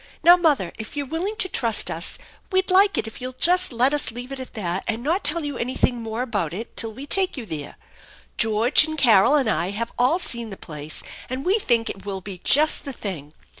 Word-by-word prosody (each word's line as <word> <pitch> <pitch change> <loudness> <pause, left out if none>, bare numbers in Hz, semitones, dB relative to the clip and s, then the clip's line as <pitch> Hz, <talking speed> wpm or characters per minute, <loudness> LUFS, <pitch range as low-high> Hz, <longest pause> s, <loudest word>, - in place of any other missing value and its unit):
Now, 345 +2 +9
mother, 300 - +1
if 220 +6 -8
you're 285 - -2
willing 335 +9 -3
to 380 - -1
trust 230 -10 +2
us, - - 0 0.3
we'd 375 0 +1
like 395 +2 +4
it - - 0
if 220 +3 -9
you'll 255 0 -6
just 360 0 +3
let 250 +4 +2
us 295 - -1
leave 245 +3 -8
it 275 - -6
at 260 - -9
that 185 -3 -2
and 225 +1 -2
not 335 +7 0
tell 305 +2 0
you 290 - -5
anything 245 0 -1
more 225 +2 -3
about 200 -10 -2
it 225 +4 -8
till 225 -1 0
we 260 +6 -9
take 375 +2 +3
you 245 - -6
there. 150 -6 -6 0.6
George 225 +5 +4
and 310 -1 -5
<~!arol 235 +1 +5
and 275 -5 +2
I 185 -4 0
have 230 +4 -4
all 255 +7 +3
seen 235 -10 0
the 195 - -8
place, 150 -1 -6 0.3
and 260 +2 -5
we 390 +5 +2
think 235 - 0
it 195 - -5
will 195 -1 -5
be 190 -1 -9
just 305 +2 +3
the 280 -2 -6
thing. 160 - -6
245 Hz, 230 wpm, -23 LUFS, 215-300 Hz, 0.6 s, Now